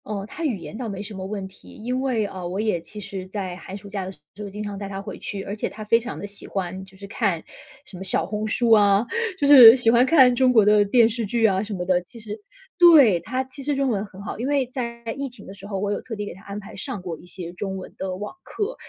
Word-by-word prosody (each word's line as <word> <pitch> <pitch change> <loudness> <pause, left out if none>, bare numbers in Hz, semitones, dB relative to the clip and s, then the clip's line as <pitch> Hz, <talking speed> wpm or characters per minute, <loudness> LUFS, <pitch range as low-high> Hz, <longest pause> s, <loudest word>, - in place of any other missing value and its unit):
哦， 200 -2 -4
她 330 - -7
语 265 -10 0
言 190 - -9
倒 230 0 -4
没 200 0 -5
什 210 +1 -8
么 190 - -6
问 195 -1 -5
题， 190 - -18
因 250 +4 -3
为， 245 -5 0
呃， 185 -3 -6
我 185 +3 -4
也 210 -6 0
其 210 +5 -11
实 190 -2 -7
在 190 -2 -5
寒 190 +1 -8
暑 205 - -12
假 200 -1 -4
的 190 - -6
时 - - -14 0.3
候 200 - -6
经 210 +2 -6
常 205 -1 -5
带 200 0 -6
她 195 -1 -5
回 195 - -7
去， 195 -1 -5
而 200 +1 -5
且 215 - -3
她 215 - -9
非 230 +2 +3
常 240 +2 -7
地 - - -6
喜 205 0 -10
欢 190 -1 -4
就 190 0 -18
是 200 - -10
看 200 -5 -1 0.4
什 - - -12
么 185 - -7
小 190 - 0
红 210 +3 -3
书 230 +2 +1
啊， 205 0 +5 0.3
就 290 - 0
是 255 -5 +11
喜 245 -3 +3
欢 235 +1 +5
看 260 -2 +6
中 255 0 +4
国 220 -4 +5
的 210 0 +5
电 225 +3 +4
视 230 +1 -3
剧 225 +2 +1
啊 190 -3 +3
什 215 0 -5
么 180 -1 -4
的， 180 -1 +2
其 235 - -13
实 215 -1 -7 0.4
对， 290 - +7
她 255 +9 -3
其 260 +2 -12
实 285 +1 -1
中 275 -1 +1
文 205 -4 0
很 190 -1 -14
好。 210 - -6
因 245 - -2
为 280 -2 +2
在 235 -2 -6 0.2
疫 280 -1 -3
情 245 - -15
的 195 - -10
时 200 - -12
候， 200 -2 -4
我 205 +1 -1
有 205 - -2
特 230 - -7
地 205 0 -4
给 - - -7
她 190 - -15
安 200 +1 -6
排 200 - -11
上 190 - -5
过 175 -2 -5
一 180 - -16
些 175 -1 -8
中 190 +1 -4
文 185 - -9
的 190 -1 -3
网 205 +3 -6
课， 435 +4 -4
210 Hz, 310 characters per minute, -23 LUFS, 195-235 Hz, 0.4 s, 是